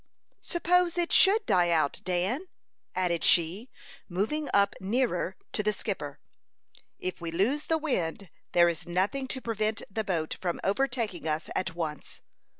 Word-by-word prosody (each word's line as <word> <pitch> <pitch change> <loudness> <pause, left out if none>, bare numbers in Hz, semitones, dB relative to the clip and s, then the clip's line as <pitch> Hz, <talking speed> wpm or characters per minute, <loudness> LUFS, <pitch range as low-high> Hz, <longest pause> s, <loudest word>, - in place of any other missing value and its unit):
"Suppose 355 0 +2
it 345 -1 +1
should 415 +2 +5
die 175 -1 +3
out, 155 -4 +1
Dan?" 185 - -1 0.5
added 175 -2 0
she, 180 +9 +3 0.4
moving 220 - -1
up 200 0 +4
nearer 195 -3 0 0.2
to - - 0
the 210 - +2
skipper. 185 -8 -4 0.8
"If 185 -1 -5
we 170 - -3
lose 220 - +1
the 325 - +2
wind 200 - -2 0.2
there 175 0 +6
is 170 0 -2
nothing 195 +10 0
to 260 - -3
prevent 220 -1 -1
the 220 +3 -1
boat 170 -6 -2
from 175 -2 -1
overtaking 225 -6 0
us 155 +1 -2
at 185 -2 -1
once." 155 -4 -5
195 Hz, 150 wpm, -29 LUFS, 175-260 Hz, 0.8 s, there